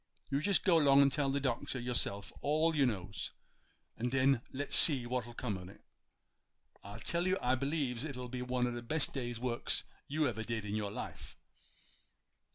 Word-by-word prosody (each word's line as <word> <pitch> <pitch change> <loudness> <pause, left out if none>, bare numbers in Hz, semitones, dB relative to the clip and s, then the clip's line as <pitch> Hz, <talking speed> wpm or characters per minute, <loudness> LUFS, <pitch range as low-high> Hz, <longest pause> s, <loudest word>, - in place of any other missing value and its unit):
You 140 - +2
just 200 +2 +2
go 180 -4 +5
'long 140 -3 +6
and 140 - +3
tell 140 -1 0
de 140 +1 0
Doctor 130 -1 -2
yo'self 120 -5 -2
all 155 +3 +2
you 140 -3 +4
knows, 100 -4 -4 0.6
and 120 +2 -2
den 135 -1 +3
let's 140 +2 -1
see 135 -6 +7
what'll 120 -1 -3
come 105 -7 -3
on't. 90 +1 -11 1.0
I 100 +2 -8
tell 170 +10 -1
you 185 +1 +2
I 125 +1 +1
b'lieves 135 -2 -1
it'll 125 -5 -5
be 125 +1 -5
one 125 0 0
o' 125 - -1
the 120 0 -5
best 150 +5 -1
day's 120 -4 -4
works 120 -1 0 0.2
you 150 +1 +1
ever 110 -3 -3
did 110 -2 -3
in 105 - -4
your 105 -1 -1
life. - - -8
125 Hz, 180 wpm, -34 LUFS, 120-140 Hz, 1.0 s, see